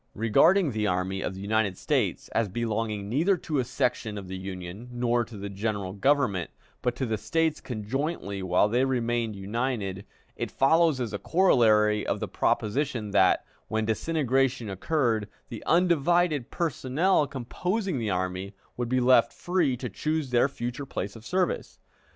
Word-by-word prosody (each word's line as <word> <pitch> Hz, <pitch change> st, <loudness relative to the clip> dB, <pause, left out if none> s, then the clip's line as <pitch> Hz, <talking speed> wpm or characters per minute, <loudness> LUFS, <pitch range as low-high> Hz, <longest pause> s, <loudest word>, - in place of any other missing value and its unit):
Regarding 155 Hz, -, +4 dB
the 110 Hz, -2 st, -1 dB
Army 95 Hz, +1 st, -1 dB
of 95 Hz, -, -3 dB
the 95 Hz, -, -8 dB
United 100 Hz, -2 st, 0 dB
States -, -, 0 dB
as 115 Hz, -3 st, 0 dB
belonging 110 Hz, -1 st, -2 dB
neither 165 Hz, -, +2 dB
to 155 Hz, -3 st, -2 dB
a -, -, +2 dB
section 120 Hz, -3 st, -1 dB
of 100 Hz, -2 st, -7 dB
the 95 Hz, -, -5 dB
Union 95 Hz, +4 st, -7 dB
nor 120 Hz, 0 st, +1 dB
to 115 Hz, -1 st, -10 dB
the 100 Hz, +1 st, -5 dB
General 100 Hz, -1 st, -3 dB
Government, 105 Hz, -, +1 dB, 0.3 s
but 125 Hz, -1 st, 0 dB
to 130 Hz, -, -2 dB
the 110 Hz, -3 st, -2 dB
States 165 Hz, +5 st, 0 dB
conjointly 115 Hz, -, -3 dB
while 95 Hz, +2 st, +3 dB
they 120 Hz, +4 st, +2 dB
remained 120 Hz, -4 st, 0 dB
united, 100 Hz, -1 st, -3 dB, 0.3 s
it -, -, -3 dB
follows 160 Hz, 0 st, +3 dB
as 115 Hz, -4 st, -3 dB
a 100 Hz, -, -2 dB
corollary 110 Hz, -, +4 dB
of -, -, -1 dB
the -, -, -3 dB
proposition 120 Hz, -1 st, -1 dB
that, -, -, +4 dB, 0.2 s
when 110 Hz, 0 st, -1 dB
disintegration 130 Hz, -2 st, 0 dB
occurred, 110 Hz, -, 0 dB, 0.2 s
the 115 Hz, -4 st, -7 dB
undivided 170 Hz, -4 st, +2 dB
personnel 160 Hz, +1 st, +1 dB
composing 180 Hz, -, -2 dB
the 110 Hz, -2 st, -2 dB
army 95 Hz, +1 st, -2 dB, 0.2 s
would 120 Hz, -1 st, -2 dB
be 130 Hz, +1 st, +2 dB
left 120 Hz, -2 st, +5 dB
free 175 Hz, -8 st, 0 dB
to 125 Hz, -, -4 dB
choose 150 Hz, +5 st, -2 dB
their 120 Hz, +2 st, +4 dB
future 125 Hz, +1 st, -5 dB
place 100 Hz, -5 st, -4 dB
of 110 Hz, -, -11 dB
service. 185 Hz, +7 st, -1 dB
120 Hz, 160 wpm, -27 LUFS, 105-140 Hz, 0.3 s, left